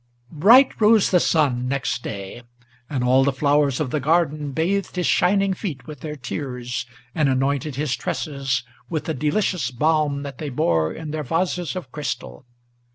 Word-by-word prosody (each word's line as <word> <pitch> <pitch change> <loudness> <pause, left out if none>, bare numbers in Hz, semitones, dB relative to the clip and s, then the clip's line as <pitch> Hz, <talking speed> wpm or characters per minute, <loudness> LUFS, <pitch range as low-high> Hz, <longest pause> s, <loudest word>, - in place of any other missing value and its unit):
Bright 230 - +5
rose 215 -1 +5
the 180 - +5
sun 135 -8 +1
next 135 0 -1
day; 100 +3 -7 0.5
and 135 -4 -1
all 130 +2 +4
the 140 - +2
flowers 140 0 +2
of 140 -5 -2
the 150 - 0
garden 150 -1 +1
Bathed 185 +8 -1
his 180 -1 -1
shining 195 +1 +3
feet 170 - -6
with 150 -3 -9
their 150 +2 -6
tears, 125 -2 -5 0.3
and 150 -3 +2
anointed 135 +2 0
his 140 -3 -1
tresses 135 -5 -2 0.3
With 155 -3 -3
the 160 - -1
delicious 150 +1 0
balm 145 +2 +1
that 140 -3 -8
they 150 - -4
bore 80 - +1
in 160 -2 -7
their 155 0 -3
vases 175 +4 -1
of 170 -9 -6
crystal. 130 - -5
145 Hz, 165 wpm, -22 LUFS, 130-165 Hz, 0.5 s, Bright